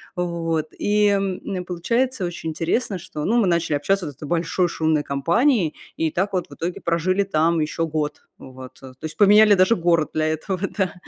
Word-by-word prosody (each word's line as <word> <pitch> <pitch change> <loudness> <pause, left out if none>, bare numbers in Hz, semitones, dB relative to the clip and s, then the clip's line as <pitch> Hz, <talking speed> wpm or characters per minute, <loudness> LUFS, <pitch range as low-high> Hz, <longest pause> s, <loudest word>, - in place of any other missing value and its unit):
вот. 165 -3 -2
И, 210 0 +2
м, 195 -2 -2
получается 225 +6 -1
очень 170 -2 -5
интересно, 185 +6 -1
что, 150 -2 -7
ну, 235 +4 +2
мы 205 - +2
начали 170 -3 +1
общаться 185 +6 0
вот 145 - -6
с - - -27
этой 150 - -8
большой 170 +2 0
шумной 160 -3 0
компанией, 170 - +1 0.2
и 160 -1 0
так 195 +3 -1
вот 180 -2 -1
в - - -11
итоге 175 +2 -5
прожили 180 +4 +1
там 165 -2 +1
еще 155 +2 -1
год, 150 -1 -3
вот. 130 -1 -11
То 130 -1 -12
есть 155 0 -6
поменяли 210 +1 +7
даже 185 +5 +4
город 170 -4 +1
для 155 0 0
этого, 165 +4 -2 0.2
да, 190 -3 0
170 Hz, 190 wpm, -22 LUFS, 155-195 Hz, 0.2 s, поменяли